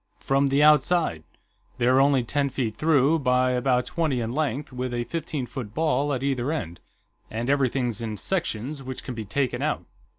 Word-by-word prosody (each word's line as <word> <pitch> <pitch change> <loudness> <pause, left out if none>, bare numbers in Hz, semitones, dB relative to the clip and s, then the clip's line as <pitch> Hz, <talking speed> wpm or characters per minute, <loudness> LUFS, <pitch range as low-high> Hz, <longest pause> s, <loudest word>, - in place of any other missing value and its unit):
"From 135 +1 +2
the 140 +2 +3
outside. 150 - +4 0.6
They're 130 +2 +4
only 135 -2 +3
ten 140 +4 0
feet 125 -5 -2
through, 155 0 +3
by 125 -1 +2
about 125 0 +1
twenty 155 -7 -1
in 115 -1 -2
length, 145 -2 -2
with 125 -1 -3
a 120 - -1
fifteen 150 -2 -4
foot 120 -3 -7
ball 150 -2 +1
at 130 -1 -2
either 135 0 0
end, 85 - -4 0.5
and 115 +4 -1
everything's 130 -4 0
in 110 -2 -4
sections, 145 - -2
which 130 -1 -7
can 130 - -5
be 110 -2 -6
taken 130 +5 -1
out. - - -1
130 Hz, 175 wpm, -25 LUFS, 120-145 Hz, 0.6 s, outside